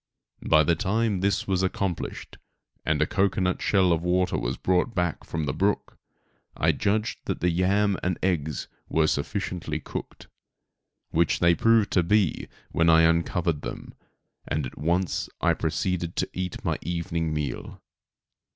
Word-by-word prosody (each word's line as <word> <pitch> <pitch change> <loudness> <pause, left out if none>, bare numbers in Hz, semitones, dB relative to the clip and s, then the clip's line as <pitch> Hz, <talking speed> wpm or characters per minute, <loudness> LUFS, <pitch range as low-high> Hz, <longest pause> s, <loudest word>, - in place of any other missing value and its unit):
By 75 - +5
the 85 - +3
time 105 +4 0
this 95 -1 0
was 95 -2 +1
accomplished, 95 -1 -3 0.4
and - - +1
a - - +1
cocoanut 95 -2 0
shell 95 -3 +3
of 80 - 0
water 90 +1 +1
was 60 +2 -2
brought 95 +6 +1 0.3
from 80 -2 -2
the 65 - -1
brook, 100 +1 0 0.6
I - - +3
judged 105 +2 -1
that - - -2
the 90 +1 +2
yam 95 +3 +2
and 90 -1 -1
eggs 80 -6 -1 0.2
were 80 -1 +3
sufficiently 80 +1 -2
cooked, - - -7 0.8
which 85 +1 +2
they 85 0 +4
proved 115 +2 +3
to 90 - +4
be 95 0 +1 0.2
when 85 0 +3
I 80 0 +6
uncovered 85 -1 +1
them, - - -7 0.5
and 75 -2 -1
I - - -4
at - - -20
once 85 +4 0 0.3
proceeded 90 -2 -1
to - - -1
eat 90 -1 -4
my - - 0
evening 85 -2 -2
meal. 75 -5 -4
90 Hz, 150 wpm, -26 LUFS, 80-95 Hz, 0.8 s, I